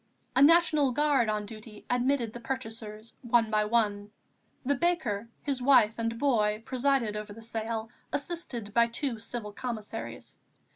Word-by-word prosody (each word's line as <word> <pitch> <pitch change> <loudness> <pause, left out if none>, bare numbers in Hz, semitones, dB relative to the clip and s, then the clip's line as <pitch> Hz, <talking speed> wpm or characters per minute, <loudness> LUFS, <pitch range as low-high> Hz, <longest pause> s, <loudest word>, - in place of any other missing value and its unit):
A 265 - +4
National 305 -3 +5
Guard 280 -4 +2
on 210 -1 -1
duty 215 0 -11
admitted 245 -2 +1
the 240 - -7
purchasers 225 -3 -6
one 235 -2 +2
by 215 0 +2
one. 210 -2 +1 0.6
The 285 - +3
baker, 250 - 0
his 275 -3 -2
wife 245 -5 +5
and 230 0 -1
boy 220 -5 +1
presided 255 -4 +1
over 210 -1 -5
the 225 - -11
sale, 225 0 -3 0.2
assisted 275 -10 -4
by 235 0 +5
two 235 0 -2
Civil 220 -2 -5
Commissaries. 220 -1 -6
230 Hz, 145 wpm, -29 LUFS, 215-265 Hz, 0.6 s, National